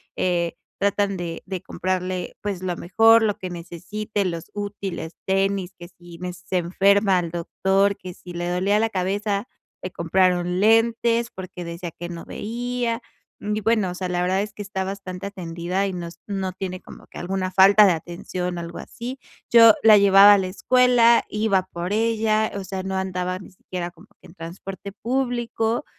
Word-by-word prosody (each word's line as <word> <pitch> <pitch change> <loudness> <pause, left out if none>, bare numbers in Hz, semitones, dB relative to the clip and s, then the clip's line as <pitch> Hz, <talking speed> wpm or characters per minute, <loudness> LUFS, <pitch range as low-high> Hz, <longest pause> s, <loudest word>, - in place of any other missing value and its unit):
eh, 175 -2 0 0.2
tratan 200 0 +1
de 170 -1 -5
de 185 -2 -5
comprarle, 185 0 -3
pues, 200 -3 -3
lo 180 -1 -1
mejor, 225 +5 +5
lo 210 -2 +1
que 185 - -6
necesite, 185 +5 -4
los 170 -3 -4
útiles, 200 -5 -5
tenis, 195 -1 0
que 175 - -10
si 175 -1 -14
me 180 0 -5
se 180 +1 -4
enferma, 195 +2 +3
al 170 -2 -4
doctor, 190 +3 +1
que 180 -1 -9
si 175 0 -11
le 175 0 -3
dolía 195 +4 +2
la 225 - +1
cabeza, 200 +2 -1 0.4
le 185 - -4
compraron 180 +1 +1
lentes 230 +2 +3
porque 185 -1 -8
decía 170 +1 -6
que 175 +2 -8
no 170 -1 -7
veía. 240 +1 -3 0.4
Mm, 210 0 -2
y 215 - -2
bueno, 215 -4 +1
o - - -7
sea, 185 0 -4
la 175 0 0
verdad 185 +2 +1
es 210 0 -5
que 205 - -8
está 195 -1 -3
bastante 195 0 -6
atendida, 180 +1 -3
y 190 - -4
nos 170 -1 -7
no 195 -2 -2
tiene 185 -1 -5
como - - -14
que - - -10
alguna 185 +1 -2
falta 195 +3 +7
de 185 - +5
atención, 175 +2 -5
algo 170 0 -7
así. 250 +3 -7 0.3
Yo 230 -2 +8
la 215 -1 +8
llevaba 200 0 +8
a - - +3
la 190 - -2
escuela, 240 +3 +4
iba 210 -3 +1
por 175 +3 -3
ella, 220 -1 +1
o 200 - -4
sea, 190 0 -5
no 190 0 -3
andaba 185 -1 -2
ni 195 - -13
siquiera 180 -1 -6
como - - -19
que - - -15
en 170 - -17
transporte 185 +4 -8
público, 240 +1 -1
190 Hz, 180 wpm, -23 LUFS, 180-210 Hz, 0.4 s, Yo